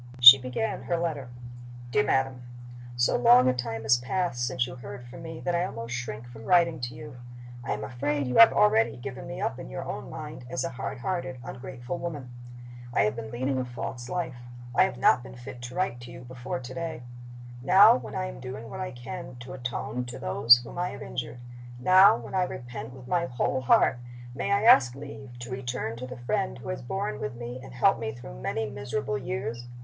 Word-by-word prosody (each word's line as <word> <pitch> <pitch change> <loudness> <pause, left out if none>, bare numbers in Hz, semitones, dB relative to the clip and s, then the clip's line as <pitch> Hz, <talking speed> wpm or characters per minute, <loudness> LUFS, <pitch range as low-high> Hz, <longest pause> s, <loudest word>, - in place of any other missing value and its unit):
She 125 +2 +12
began 130 - -3
her 170 - 0
letter. 155 -7 -3 0.6
"DEAR 140 - +3
MADAM 135 -2 0 0.5
So 120 0 +2
long 125 +1 +6
a 130 - +4
time 115 -3 -4
has 110 +2 +5
passed 125 -1 -1
since 130 -2 0
you 125 - -8
heard 120 0 -9
from 125 +4 -11
me 165 -1 -7
that 175 - -1
I 170 0 +2
almost 115 -9 -5
shrink 120 -2 -5
from 115 -2 -11
writing 170 -3 +4
to 120 0 -5
you. 115 +1 -10 0.5
I - - -1
am 105 +1 -5
afraid 140 +6 -1
you 125 - -1
have 230 - +10
already 210 - +3
given 130 +1 -7
me 130 - -6
up - - -2
in - - -8
your - - -5
own - - -5
mind 125 - -8
as 130 - -2
a - - -1
hard 125 -1 -5
hearted, 170 -8 -3
ungrateful 130 +5 -6
woman. 145 -7 -5 0.6
"I 100 - +3
have 105 +2 +1
been 115 -1 -6
leading 130 +3 -1
a - - 0
false 120 0 -6
life; 175 -8 -3 0.4
I - - +5
have - - -4
not 125 0 +4
been 120 - -11
fit 125 0 -10
to 125 +1 -7
write 160 -9 -1
to 120 0 -10
you 125 - -10
before 125 +1 -5
to 130 0 -8
day. 160 -4 -5 0.6
Now, 195 - +8
when 115 -4 -6
I 60 - -1
am - - -7
doing 115 - -7
what - - -6
I 185 - -3
can 125 +1 -8
to 130 +2 -8
atone 125 -1 -4
to 120 +1 -7
those 115 +1 +6
whom 125 - -8
I 180 +1 0
have - - -8
injured 120 -1 -5 0.4
now, 185 +3 +7
when 115 -1 -9
I 190 - +2
repent 120 -8 -5
with 130 -1 -12
my 170 +1 +1
whole 125 +1 -1
heart 130 0 +4 0.3
may - - -3
I 200 +1 +3
ask 130 - +6
leave 140 -3 -9
to 120 +1 -7
return 125 -3 -3
to 125 +2 -6
the 125 0 -8
friend 60 - -1
who - - -8
has - - -3
borne 105 +12 -3
with 140 -3 -4
me 120 +1 -6
and 130 -1 -11
helped 125 - +3
me 110 -1 -3
through - - -10
many 110 - -2
miserable 135 -3 -3
years? 120 -1 -4
125 Hz, 215 wpm, -27 LUFS, 120-135 Hz, 0.6 s, She